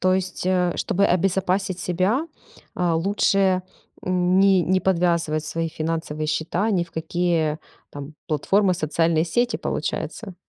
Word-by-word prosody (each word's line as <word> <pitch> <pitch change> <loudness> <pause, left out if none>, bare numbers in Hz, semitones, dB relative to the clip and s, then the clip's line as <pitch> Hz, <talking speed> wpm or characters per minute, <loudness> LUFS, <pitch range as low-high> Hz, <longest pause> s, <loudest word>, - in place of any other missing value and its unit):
То 185 0 +3
есть, 185 -1 -3
э, 180 -2 +2
чтобы 200 +2 +1
обезопасить 185 +1 0
себя, 190 - 0 0.5
а, 175 -2 +1
лучше 190 +1 +2 0.4
не 185 +1 +3
не 185 +2 +1
подвязывать 170 -4 +1
свои 165 +1 -2
финансовые 155 -1 -3
счета 170 +7 -1
ни 175 -4 +1
в 170 - -22
какие 160 -1 0 0.3
там 145 +2 -9
платформы, 185 +5 +2
социальные 165 0 +1
сети, 235 +7 0
получается? 195 -6 -4
180 Hz, 125 wpm, -23 LUFS, 165-190 Hz, 0.5 s, То